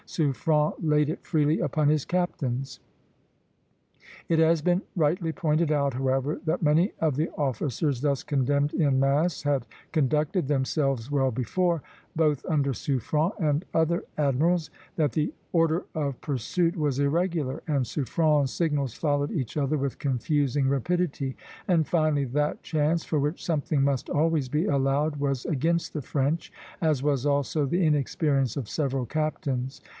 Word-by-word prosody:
Suffren 150 0 +1
laid 150 -2 +2
it 165 - -4
freely 155 -1 +1
upon 155 -2 +1
his 150 -2 +2
captains. 135 -7 -2 1.5
It 165 -1 +2
has 160 0 +4
been 180 +3 +2
rightly 165 0 +1
pointed 155 0 +1
out, 140 -2 +1
however, 135 +3 -1
that 160 +2 0
many 160 +6 +3
of 155 -4 +1
the 155 +4 0
officers 140 0 -1
thus 140 -2 +1
condemned 145 +1 +1
in 140 -5 +2
mass 140 +4 +1
had 140 -4 0 0.3
conducted 150 +2 +1
themselves 135 -3 0
well 135 -2 +2
before, 165 +8 0 0.3
both 155 -4 +1
under 145 -5 +1
Suffren 150 - 0
and 150 -1 +1
other 165 +1 +2
admirals; 155 +4 +1 0.3
that 150 -4 +1
the 155 -1 0 0.2
order 165 +1 +2
of 140 -4 -2
pursuit 165 - -1
was 145 -5 0
irregular, 155 -1 0
and 140 -5 +1
Suffren's 145 +2 +1
signals 145 -7 -1
followed 145 -2 0
each 130 -8 -3
other 150 0 +1
with 140 -1 -3
confusing 140 0 0
rapidity; 140 -1 -1 0.3
and 165 -4 +2
finally 155 -4 +2
that 150 +4 -1
chance, 155 +1 0
for 155 - 0
which 150 +5 -2
something 150 -3 0
must 135 -2 0
always 155 -3 +1
be 150 +5 0
allowed, 140 +2 +1
was 140 -3 -1
against 165 +3 0
the 150 - -3
French, 140 +5 -1 0.3
as 155 -5 +2
was 145 -2 +1
also 145 +1 +1
the 175 +6 +1
inexperience 140 -3 +1
of 130 -6 -3
several 135 -2 -1
captains. 135 -2 -2
150 Hz, 145 wpm, -26 LUFS, 135-160 Hz, 1.5 s, has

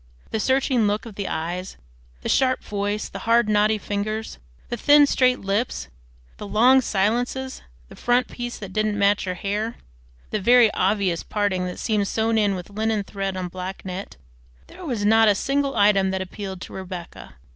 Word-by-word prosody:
The 220 - -1
searching 260 -2 +2
look 205 +2 -1
of 225 - -9
the 200 0 -4
eyes, 175 +4 -4 0.5
the - - -3
sharp 260 -1 +2
voice, 205 +1 -2
the 195 - -8
hard 235 -1 +4
knotty 210 +1 +3
fingers, 210 - -4 0.3
the - - -2
thin 290 +5 +6
straight 255 -2 +2
lips, 200 - -2 0.5
the 210 - -7
long 250 +6 +5
silences, 245 +5 -1 0.3
the - - -13
"front 245 +1 +1
piece" 240 0 -6
that 195 -3 -8
didn't 215 0 0
match 200 0 +2
her 185 -1 -3
hair, 210 +5 -3 0.6
the 215 - -1
very 240 +1 +6
obvious 190 -3 +1
"parting" 200 -3 -1
that 180 - -6
seemed 210 -3 0
sewed 225 +1 +1
in 205 -2 +2
with 180 +2 -8
linen 215 0 -1
thread 195 -1 -4
on 185 -1 -3
black 185 +2 -7
net, 185 - -6 0.5
there - - -13
was 240 -10 -2
not 225 +1 +5
a 205 - +5
single 275 +5 0
item 200 -2 +4
that 190 0 -1
appealed 190 0 -7
to - - -9
Rebecca. 185 -2 -8
210 Hz, 180 wpm, -23 LUFS, 195-235 Hz, 0.6 s, thin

